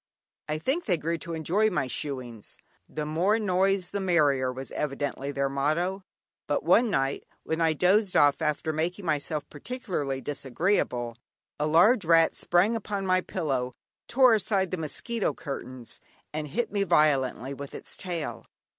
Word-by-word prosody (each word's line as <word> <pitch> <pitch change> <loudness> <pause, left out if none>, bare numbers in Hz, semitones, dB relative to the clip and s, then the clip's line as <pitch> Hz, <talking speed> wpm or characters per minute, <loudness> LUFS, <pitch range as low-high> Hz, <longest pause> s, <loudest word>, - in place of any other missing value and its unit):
I 155 - 0
think 270 - -1
they 180 -4 +2
grew 165 +2 -2
to 170 0 -5
enjoy 185 +7 +2
my 150 -9 0
"shooings;" 125 -4 -5 0.3
"the 150 -1 -4
more 175 +8 +2
noise 195 -2 +1
the 200 - -2
merrier" 145 -9 +2
was 130 +1 -7
evidently 140 -1 -3
their 140 0 0
motto; 155 +8 -1 0.4
but - - 0
one 240 -1 +4
night 135 -7 0 0.2
when 160 +1 -2
I 160 -1 +3
dozed 185 +5 +2
off 145 +2 +4
after 155 +1 -1
making 175 +5 -2
myself 150 -1 -1
particularly 150 - -4
disagreeable, 135 - -1 0.4
a 150 - +1
large 185 +8 +5
rat 165 0 +4
sprang 185 +6 +2
upon 200 -3 -3
my 185 0 +3
pillow, 135 -10 -2 0.3
tore 255 -1 +5
aside 195 -3 +1
the 185 - -1
mosquito 200 +8 -2
curtains, 130 -4 -8 0.3
and 155 0 -3
hit 230 - -2
me 200 -1 0
violently 140 - +2
with 140 0 -8
its - - -6
tail. 170 -5 -4
160 Hz, 155 wpm, -27 LUFS, 140-190 Hz, 0.4 s, large